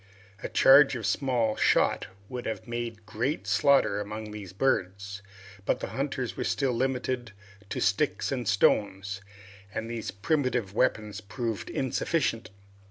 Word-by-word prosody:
A - - -4
charge 135 0 +7
of 115 -4 -4
small 120 -3 +1
shot - - +2 0.2
would 125 +1 -5
have 110 0 -4
made 120 -2 -4
great 125 +9 -2
slaughter 135 -7 +3
among 105 +1 -6
these 105 -4 -8
birds, 100 -3 -1 0.4
but - - +1
the - - -4
hunters 135 -3 -2
were - - -2
still 135 -2 +1
limited 125 -2 -1 0.4
to - - -3
sticks 100 +13 +1
and 125 -5 -2
stones, 100 -2 +2 0.5
and 110 +3 -4
these 115 -1 -4
primitive 125 -2 0
weapons 105 -3 0
proved 110 +1 -4
very - - -6
insufficient. 130 - 0
115 Hz, 140 wpm, -28 LUFS, 105-130 Hz, 0.5 s, charge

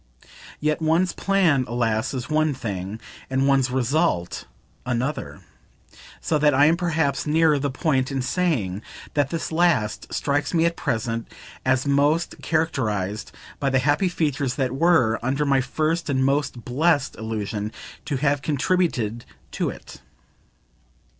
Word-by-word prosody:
Yet 150 +1 0
one's 165 +3 +2
plan, 180 -9 +2
alas, 115 0 0
is 130 -1 -4
one 155 -1 +1
thing 100 -2 -5 0.3
and 135 +1 +1
one's 135 -2 +3
result 130 - 0 0.4
another; 125 +4 -3 0.8
so 155 - 0
that 150 -2 +4
I 140 +2 +6
am 160 +2 +5
perhaps 160 -5 0
nearer 155 -1 +3
the 140 +1 -1
point 135 -1 0
in 135 -2 -1
saying 125 - 0 0.3
that 145 -2 +1
this 165 0 -3
last 160 - +1
strikes 145 +4 -1
me 165 0 +4
at 170 0 +1
present 115 -5 -2 0.4
as 130 0 +2
most 145 +4 +1
characterised 110 - -1 0.3
by 140 - +1
the 135 - +2
happy 145 +8 +2
features 145 -6 -1
that 130 -3 0
WERE, 135 -7 +3
under 135 +5 0
my 135 -2 +3
first 155 +5 -1
and 130 -1 +2
most 135 -3 -1
blest 145 +4 +1
illusion, 110 -1 -4 0.3
to 145 - -1
have 140 +1 +1
contributed 140 - 0 0.3
to - - -1
it. - - -11
140 Hz, 140 wpm, -23 LUFS, 120-155 Hz, 0.8 s, I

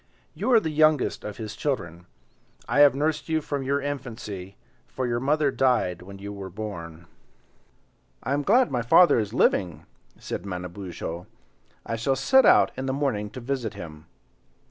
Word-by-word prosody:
You 260 - -2
are 230 - +8
the 160 -7 -3
youngest 155 -2 +2
of 105 -1 -6
his 110 -1 -6
children. 90 - -3 0.6
I - - +1
have 145 -3 +7
nursed 150 +3 -1
you 160 0 +2
from 145 -2 -4
your 140 +2 0
infancy, 115 -9 -6 0.3
for 130 - -4
your 120 -1 -1
mother 145 +2 +1
died 125 -11 +1
when 100 +2 -11
you 100 +1 -7
were 100 -1 -7
born." 85 -5 -7 1.2
"I 135 - -1
am 145 - +1
glad 235 - +3
my 125 - 0
father 120 +5 +5
is 105 -2 -2
living," 90 -7 +1 0.3
said - - -6
Manabozho, 90 -2 -6 0.6
"I 115 - -3
shall 135 +4 0
set 265 - +4
out - - +6
in 135 - -4
the 130 - 0
morning 130 -7 -1
to 130 - -9
visit 125 -3 -3
him." 75 -1 -10
120 Hz, 165 wpm, -25 LUFS, 95-140 Hz, 1.2 s, are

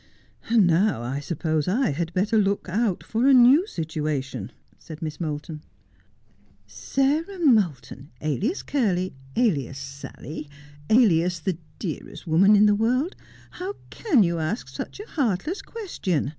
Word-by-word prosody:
' - - -23
And 225 -4 +5
now 175 - +2
I 130 +4 -3
suppose 155 0 -2
I 235 - +1
had 165 +3 -3
better 205 +5 +1
look 200 -1 0
out 200 +1 0
for 230 +4 0
a 275 - +7
new 255 +8 +7
situa 155 - -2
tion,' 125 -7 -7 0.3
said 155 -3 -10
Miss 155 0 -5
Moulton. 150 -1 -4 0.6
' 100 -3 -35
Sarah 280 - -1
Moulton, 180 - +1
alias 190 - -1
Curly, 190 -9 0 0.2
alias 145 - +1
Sally, 140 +2 -8 0.4
alias 180 -7 +4
the 170 0 -2 0.2
dearest 170 0 -6
woman 185 +6 +5
in 205 +1 +6
the 210 - +5
world, 250 - +1 0.4
how 380 +3 -5 0.2
can 310 - +3
you 170 -2 0
ask 160 - -3
such 135 - -7
a 415 - -7
heartless 290 - -1
question?' 195 - -3
185 Hz, 145 wpm, -24 LUFS, 150-240 Hz, 0.6 s, a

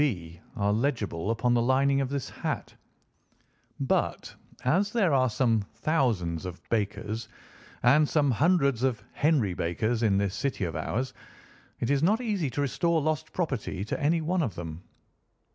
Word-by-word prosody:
B.' 85 - -2
are 100 -2 +1
legible 110 - -1
upon 120 +2 +1
the 120 - +3
lining 135 +3 +3
of 135 - -1
this 140 -1 -3
hat, - - -4 1.1
but - - 0 0.3
as 190 +10 +2
there 200 -10 +3
are 130 -2 +4
some 115 -1 +2
thousands 115 - 0
of 90 -1 -7
Bakers, 110 +1 -2 0.5
and 140 +5 +5
some 145 -3 +3
hundreds 140 - +2
of 130 -3 0
Henry 145 - +2
Bakers 110 +8 -1
in 105 -4 +3
this 100 -1 0
city 135 -2 -2
of 80 -4 -2
ours, 115 +11 -2 0.7
it 120 - 0
is 140 -1 +2
not 205 +8 +3
easy 205 - -1
to 135 +4 -2
restore 165 +4 +1
lost 155 0 -1
property 135 - -2
to - - -3
any 160 +3 +2
one 175 +3 0
of 115 - -2
them." 85 -1 -6
125 Hz, 160 wpm, -28 LUFS, 105-150 Hz, 1.1 s, and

